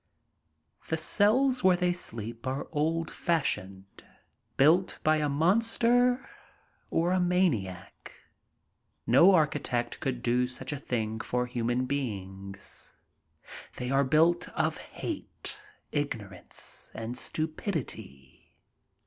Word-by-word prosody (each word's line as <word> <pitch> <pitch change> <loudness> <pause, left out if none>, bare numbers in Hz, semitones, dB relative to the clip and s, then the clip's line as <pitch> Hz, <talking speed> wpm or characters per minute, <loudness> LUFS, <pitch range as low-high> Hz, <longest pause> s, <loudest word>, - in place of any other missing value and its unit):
The 160 - +1
cells 245 - +3
where 185 -1 +5
they 180 0 +2
sleep 115 -7 -4
are 135 +2 -2
old 165 +1 0
fashioned, 95 - -2 0.5
built 165 +7 +4
by 155 0 +4
a 150 -1 0
monster 230 - +3 0.6
or 170 +2 +1
a 185 - +2
maniac. 170 - -1 0.9
No 170 +11 +7
architect 140 -6 0
could 125 -3 -3
do 125 +1 +2
such 130 +2 -4
a 145 - -4
thing 110 -4 -2
for 125 +2 -1
human 120 0 -1
beings. 100 -7 -5 0.8
They 125 +1 -3
are 135 +1 +4
built 160 +6 +3
of - - +1
hate, - - -6 0.3
ignorance, 105 -11 -5
and 115 +2 -5
stupidity. 150 - -4
140 Hz, 105 wpm, -29 LUFS, 120-175 Hz, 0.9 s, No